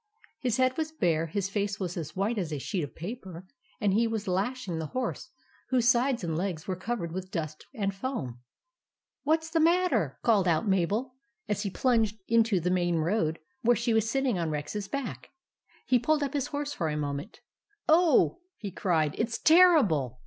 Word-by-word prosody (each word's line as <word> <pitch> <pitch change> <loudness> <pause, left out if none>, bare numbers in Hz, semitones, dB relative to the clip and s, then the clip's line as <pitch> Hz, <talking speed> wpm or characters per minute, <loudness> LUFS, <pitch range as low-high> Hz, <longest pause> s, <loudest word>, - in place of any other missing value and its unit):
His 245 -4 0
head 255 0 +2
was 315 0 -2
bare; 165 - +1
his 195 +4 -2
face 200 0 -2
was 180 -3 -3
as 155 -3 -5
white 205 +4 0
as 170 -5 -3
a 150 - -2
sheet 170 +5 -2
of 145 - -7
paper; 185 -2 -7 0.3
and 205 -4 +2
he 230 +3 +3
was 220 -2 -3
lashing 190 -1 -1
the 160 - -3
horse, 255 0 -3 0.4
whose 250 -2 +2
sides 250 -2 +2
and 165 -2 -2
legs 170 -2 -3
were 190 - -1
covered 185 -2 -3
with 185 +2 -5
dust 155 -4 -5
and 200 -4 -1
foam. 195 - -4 0.8
"What's 320 +2 0
the 325 - +2
matter?" 335 - +2
called 210 -6 +3
out 170 +5 +2
Mabel, 200 +7 +1 0.3
as 210 0 -1
he 205 - -2
plunged 225 0 +1
into 225 -4 +3
the 180 +2 0
main 175 -1 +1
road 165 0 0 0.2
where 240 0 +4
she 235 +1 0
was 220 0 +2
sitting 260 -6 0
on 165 -2 -1
Rex's 155 +7 -4
back. 200 - -5 0.6
He 250 - +3
pulled 300 +5 +1
up 275 0 -3
his 285 -3 -1
horse 290 -1 -3
for 165 - -2
a 150 - -2
moment. 145 +5 -4 0.5
"Oh," 330 0 +4 0.2
he 200 -3 -6
cried, 160 -5 +1
"it's 235 +1 0
terrible! 260 - +5
205 Hz, 185 wpm, -28 LUFS, 170-255 Hz, 0.8 s, terrible